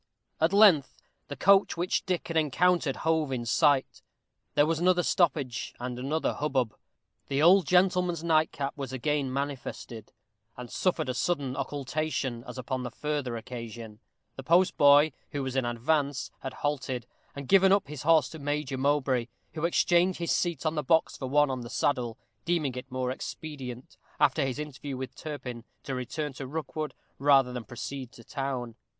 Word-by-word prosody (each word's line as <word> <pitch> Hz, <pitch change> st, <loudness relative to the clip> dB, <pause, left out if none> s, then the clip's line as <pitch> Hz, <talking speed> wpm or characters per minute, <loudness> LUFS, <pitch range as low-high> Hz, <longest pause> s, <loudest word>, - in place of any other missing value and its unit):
At 160 Hz, +2 st, +3 dB
length 195 Hz, -9 st, +5 dB, 0.3 s
the 145 Hz, -, -6 dB
coach 195 Hz, +5 st, +4 dB
which 175 Hz, +2 st, -1 dB
Dick 180 Hz, -2 st, -1 dB
had 165 Hz, -, -3 dB
encountered 160 Hz, 0 st, +2 dB
hove 160 Hz, -3 st, +1 dB
in 120 Hz, -2 st, -2 dB
sight. 135 Hz, +3 st, +2 dB, 0.5 s
There 145 Hz, -, +5 dB
was 160 Hz, 0 st, 0 dB
another 180 Hz, 0 st, +3 dB
stoppage 145 Hz, -10 st, 0 dB
and 125 Hz, 0 st, -4 dB
another 150 Hz, +5 st, -1 dB
hubbub. 130 Hz, -6 st, -1 dB, 0.5 s
The 140 Hz, +2 st, 0 dB
old 185 Hz, +2 st, +6 dB
gentleman's 180 Hz, -2 st, +2 dB
nightcap 155 Hz, -4 st, +1 dB
was 135 Hz, -4 st, -5 dB
again 140 Hz, +1 st, -1 dB
manifested, 135 Hz, -4 st, -5 dB, 0.5 s
and 125 Hz, -1 st, -8 dB
suffered 170 Hz, -5 st, 0 dB
a 125 Hz, -, -1 dB
sudden 140 Hz, -2 st, -1 dB
occultation, 140 Hz, -2 st, -3 dB
as -, -, -8 dB
upon 130 Hz, 0 st, -3 dB
the 125 Hz, -, -4 dB
former 145 Hz, -3 st, -3 dB
occasion. 115 Hz, -2 st, -8 dB, 0.4 s
The -, -, -5 dB
postboy, 150 Hz, -2 st, +5 dB, 0.2 s
who 145 Hz, -1 st, -2 dB
was 130 Hz, 0 st, -4 dB
in 130 Hz, -2 st, +1 dB
advance, 140 Hz, +4 st, 0 dB
had 135 Hz, -, -6 dB
halted, 130 Hz, -4 st, -2 dB, 0.3 s
and 140 Hz, -1 st, -7 dB
given 190 Hz, -1 st, +6 dB
up 200 Hz, -6 st, +3 dB
his 150 Hz, -3 st, -7 dB
horse 155 Hz, -4 st, +4 dB
to 160 Hz, -, -9 dB
Major 145 Hz, -2 st, -2 dB
Mowbray, 130 Hz, -3 st, +1 dB, 0.3 s
who 160 Hz, 0 st, -2 dB
exchanged 175 Hz, +1 st, +3 dB
his 170 Hz, -1 st, -2 dB
seat 170 Hz, -4 st, 0 dB
on 155 Hz, -, +1 dB
the 150 Hz, -, -1 dB
box 160 Hz, +3 st, +2 dB
for 130 Hz, -, -5 dB
one 145 Hz, 0 st, +3 dB
on 130 Hz, -1 st, -3 dB
the 120 Hz, -, -8 dB
saddle, 125 Hz, -4 st, 0 dB, 0.3 s
deeming 165 Hz, -6 st, 0 dB
it 125 Hz, +1 st, -8 dB
more 130 Hz, 0 st, -1 dB
expedient, 130 Hz, -3 st, -7 dB, 0.2 s
after 145 Hz, 0 st, +3 dB
his 135 Hz, -1 st, -2 dB
interview 145 Hz, -2 st, -6 dB
with 130 Hz, 0 st, -6 dB
Turpin, 130 Hz, -6 st, -7 dB, 0.2 s
to 135 Hz, -, -4 dB
return 140 Hz, +3 st, -4 dB
to 130 Hz, 0 st, -7 dB
Rookwood, 155 Hz, +1 st, -4 dB, 0.2 s
rather 135 Hz, -3 st, +4 dB
than 125 Hz, -2 st, -5 dB
to -, -, -38 dB
proceed 130 Hz, +1 st, -6 dB
to 115 Hz, -, -14 dB
town. 130 Hz, -3 st, -4 dB
140 Hz, 170 wpm, -28 LUFS, 130-160 Hz, 0.5 s, old